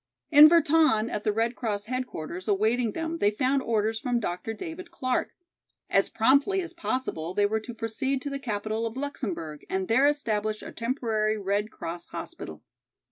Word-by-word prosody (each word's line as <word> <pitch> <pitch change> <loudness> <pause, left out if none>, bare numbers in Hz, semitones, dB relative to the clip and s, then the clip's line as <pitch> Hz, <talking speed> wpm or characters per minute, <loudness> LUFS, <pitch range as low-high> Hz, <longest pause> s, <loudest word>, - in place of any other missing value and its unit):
In 300 0 +10
Virton, 310 -8 +4
at 210 - -3
the 215 - +2
Red 230 +3 0
Cross 205 -3 -3
headquarters, 200 -8 -4
awaiting 220 +3 +1
them 330 0 -3
they 205 - +4
found 260 +5 +1
orders 220 -2 0
from 245 -2 0
Dr. 180 0 -3
David 340 - -7
Clark. 255 -7 -1 0.6
As 195 - +3
promptly 280 - +3
as 345 -2 -5
possible 255 - -3
they 205 - +3
were 220 +2 +1
to 235 +2 -9
proceed 245 +5 -1
to 285 - -4
the 275 - -3
capital 220 -2 -2
of 225 +3 -7
Luxemburg 195 - -4
and 190 0 -1
there 260 +5 +4
establish 215 -7 -1
a - - -7
temporary 225 -3 -1
Red 205 +1 -1
Cross 170 -3 -7
hospital. - - -8
225 Hz, 170 wpm, -27 LUFS, 210-275 Hz, 0.6 s, In